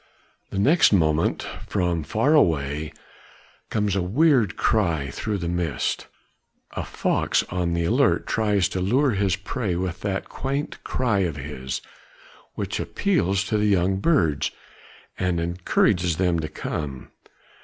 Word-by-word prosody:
The - - -5
next 145 - +5
moment 80 -5 +2 0.2
from 85 -2 0
far 115 - +1
away 75 - +2 0.8
comes 105 -3 0
a 95 - +1
weird 120 - +3
cry 85 - +1
through 105 +7 -3
the 85 -3 -4
mist. 85 -3 -2 0.6
A - - -4
fox - - 0
on 90 -1 -1
the 85 - 0
alert - - +2
tries 105 -4 +1
to 95 - -3
lure 130 +9 +2
his 100 -3 +1
prey 100 0 -3
with 90 0 -3
that 100 -1 -2
quaint 140 +2 -4
cry 115 -6 0
of 85 -5 0
his, 65 -2 -5 0.7
which - - -3
appeals 100 - 0
to 105 +2 -1
the 105 - +2
young 95 -1 +2
birds 90 - +2 0.7
and 90 -2 0
encourages 85 0 +1
them 90 -2 +1
to 80 - -3
come. 70 -3 -5
90 Hz, 135 wpm, -24 LUFS, 85-105 Hz, 0.8 s, next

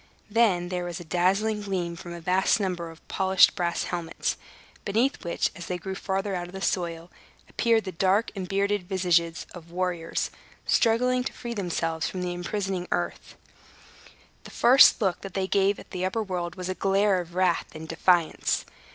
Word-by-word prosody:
Then 200 -6 +3
there 180 -1 -2
was 175 0 -5
a - - -8
dazzling 195 +6 +1
gleam 180 -4 -2
from 175 +1 -9
a 170 - -6
vast 185 +6 +2
number 180 -4 -2
of 165 0 -15
polished 190 -1 +4
brass 175 -1 -1
helmets, 170 -2 -2 0.5
beneath 230 +7 0
which, 170 - -1
as 170 - -8
they 180 - -2
grew 190 +2 -5
farther 195 +1 -2
out 175 -1 -3
of 180 - -13
the 190 - -6
soil, 170 -1 -2 0.4
appeared 230 -2 +2
the 190 - -5
dark 190 +5 +1
and 190 -2 -4
bearded 200 -1 0
visages 175 -3 +1
of 170 -2 -11
warriors, 175 -1 -2 0.3
struggling 250 +2 +3
to - - -3
free 235 -1 -6
themselves 165 -5 -2
from 185 -1 -4
the 180 0 -2
imprisoning 185 0 -3
earth. - - -3 1.1
The - - -11
first 250 +1 +6
look 190 -4 0
that 195 -2 -9
they 190 -1 0
gave 195 +1 +2
at - - -13
the 180 - -3
upper 190 +4 0
world 175 -3 -4
was 180 -1 -5
a 185 - -1
glare 195 0 +2
of 175 0 -12
wrath 185 -2 +2
and 160 0 -7
defiance. 165 0 +1
185 Hz, 180 wpm, -26 LUFS, 175-195 Hz, 1.1 s, first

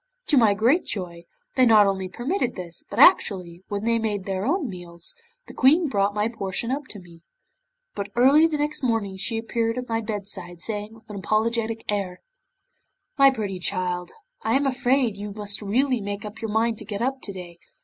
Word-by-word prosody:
To - - +4
my 220 -5 +5
great 245 - +3
joy, 175 -4 -6 0.3
they 260 - +4
not 220 -4 +7
only 190 -1 -1
permitted 245 - -2
this, 175 -3 -5
but 200 - -7
actually, 185 - +4
when 205 0 -3
they 230 0 +2
had 200 -2 -5
their 195 +2 -2
own 320 0 +1
meals, 175 -4 -2 0.3
the - - -12
Queen 305 +5 +4
brought 200 -2 +1
my 210 +1 +1
portion 225 +1 -3
up 285 +1 -2
to 205 - -9
me. 170 -2 -16 0.7
But 200 0 -4
early 275 +6 +6
the 310 -2 -2
next 300 +1 -1
morning 225 -6 -1
she 225 +4 -2
appeared 230 +1 -1
at 250 0 -4
my 225 0 -1
bedside, 200 -5 -4
saying, 210 +3 -4
with 220 0 -20
an 205 - -6
apologetic 225 +4 -1
air: 195 -3 -2 1.0
'"My 275 0 +8
pretty 205 -8 -3
child, 180 -1 -1 0.3
I - - +1
am 280 +1 +2
afraid 255 -4 +1
you 205 0 -6
must 205 0 -3
really 245 +4 +1
make 200 +1 -5
up 210 +2 -9
your 225 - -3
mind 225 +1 +1
to - - -7
get 205 +2 -3
up 265 +1 -1
to 200 - -5
day. 175 -3 -10
215 Hz, 195 wpm, -24 LUFS, 195-245 Hz, 1.0 s, My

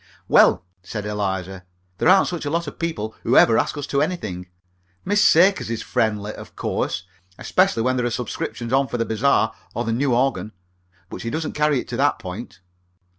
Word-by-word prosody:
"Well," 90 - +5 0.2
said 105 +3 -6
Eliza, 95 -3 -3 0.4
"there - - +3
aren't 190 +1 +6
such 175 -2 -4
a - - -1
lot 170 +2 -1
of 145 - -9
people 115 -11 -3
who - - +2
ever 115 - +6
ask - - -1
us 145 - -3
to 140 -1 0
anything. 110 - -3 0.6
Miss 205 +2 +3
Sakers 185 - +4
is 115 -1 -3
friendly, 105 -1 -1
of - - -12
course, 90 - -2 0.3
especially 115 - +1
when 130 +1 +1
there 125 - 0
are - - 0
subscriptions 120 0 -4
on 135 0 +3
for 120 - -3
the 115 - 0
bazaar 110 0 +2 0.2
or 120 - -2
the 115 - -1
new 130 +1 +1
organ, 125 -4 0 0.6
but - - -7
she 115 - -3
doesn't 155 +4 -3
carry 150 -2 +2
it - - -7
to 120 - -4
that 145 +1 +2
point." 95 +4 -8
120 Hz, 195 wpm, -22 LUFS, 105-145 Hz, 0.6 s, aren't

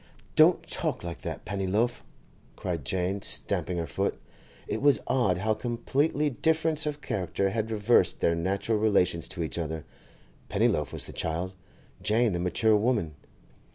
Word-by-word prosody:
'Don't - - +5
talk - - -1
like 85 -1 -6
that, - - -6
Pennyloaf!' 100 +5 0 0.5
cried 85 -5 -3
Jane, 95 +4 -1
stamping 90 -2 +1
her 85 - -1
foot, 70 - -2 0.5
(It - - -2
was 145 0 +5
odd 120 -9 +2
how 110 +4 +1
completely 135 +6 0
difference 160 +3 +1
of 150 0 -3
character 95 0 -1
had 110 0 -2
reversed 110 +2 +3
their 85 - +2
natural 100 +6 0
relations 100 -6 +2
to 85 - -4
each 80 - -3
other; 80 -1 -4 0.6
Pennyloaf - - +1
was - - -3
the - - -8
child, 85 +4 -2 0.5
Jane 110 0 +2
the 85 - -1
mature 105 +5 +2
woman.) 105 -7 +1
100 Hz, 150 wpm, -28 LUFS, 90-120 Hz, 0.6 s, Don't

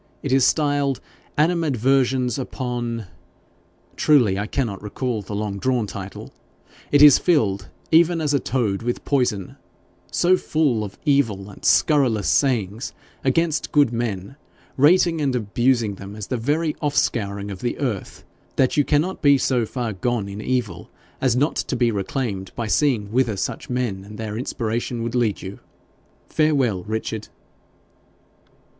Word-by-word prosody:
It 140 - -2
is 135 -1 +4
styled 145 -2 +2 0.4
"Animadversions 135 -5 +2
upon 120 -3 -4 0.5
." - - -35
Truly, 120 -11 +3
I 105 - -2
cannot 115 -6 -2
recall 110 +2 -3
the 100 +1 -6
long 100 -1 -3
drawn 125 -1 +1
title. 100 -1 -8 0.6
It 145 0 +6
is 145 -2 +9
filled, 105 - +1 0.2
even 165 +1 +5
as 150 -2 0
a 140 - +3
toad 115 -6 -1
with 120 +1 -3
poison, 120 -9 0 0.5
so 185 +1 +3
full 145 -12 0
of 100 -1 -8
evil 110 -9 +1
and - - -15
scurrilous 130 -9 +3
sayings 115 -4 +1 0.3
against 160 +4 +1
good 145 -5 +3
men, 115 +1 -3 0.4
rating 165 +3 +4
and 135 -3 0
abusing 120 0 +1
them 100 +1 -9
as 105 -2 -6
the 130 - -3
very 150 +6 0
off 145 -2 -1
scouring 100 -2 -1
of 95 - -8
the 120 - -2
earth, 120 -9 -4 0.3
that 130 -2 +2
you 145 - +4
cannot 155 +7 +1
yet - - -33
be 140 -1 +6
so 125 -3 +1
far 120 -3 -3
gone 110 +2 -1
in 100 +1 -6
evil 110 -9 -2 0.3
as 130 -3 +2
not 145 +5 +1
to - - -2
be 120 -1 +2
reclaimed 100 -1 -3
by 115 - -3
seeing 105 +1 +1
whither 120 -4 +1
such 95 - -4
men 120 -6 -2
and 105 +2 -11
their 110 -1 -5
inspiration 115 0 -3
would 115 0 -3
lead 120 -5 0
you. 95 +1 -7 0.7
Farewell, 135 - +1
Richard.' 110 0 -4
120 Hz, 150 wpm, -22 LUFS, 105-140 Hz, 0.7 s, is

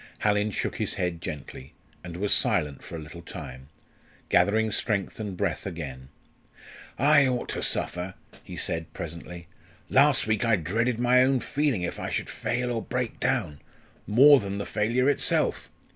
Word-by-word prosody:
Hallin 105 0 +2
shook 100 - -3
his - - -2
head 90 -2 -2
gently, 70 -3 -7 0.3
and 85 -1 -7
was 100 +2 +1
silent 75 -3 0
for - - -8
a - - -5
little 80 +2 -10
time, 65 -5 -9 0.6
gathering 110 +5 +3
strength 105 -2 -1
and 100 -4 -5
breath - - -2
again. 70 -7 -7 0.9
"I 145 +1 +5
ought 125 -1 -2
to - - -3
suffer" 90 +1 -1 0.3
he - - -9
said, 80 -1 -3
presently. 85 +1 -7 0.5
"Last 140 +1 +5
week 110 0 0
I 115 -2 +4
dreaded 110 +8 0
my 125 +1 +4
own 130 0 +3
feeling 140 -8 0
if 90 - -4
I - - -3
should - - -3
fail 125 +1 -2
or 115 -2 -1
break 125 -1 -3
down 75 -1 -1 0.5
more 135 +6 +7
than 100 -2 -4
the 100 - -3
failure 120 +5 +1
itself. 145 - +1
105 Hz, 160 wpm, -27 LUFS, 85-125 Hz, 0.9 s, more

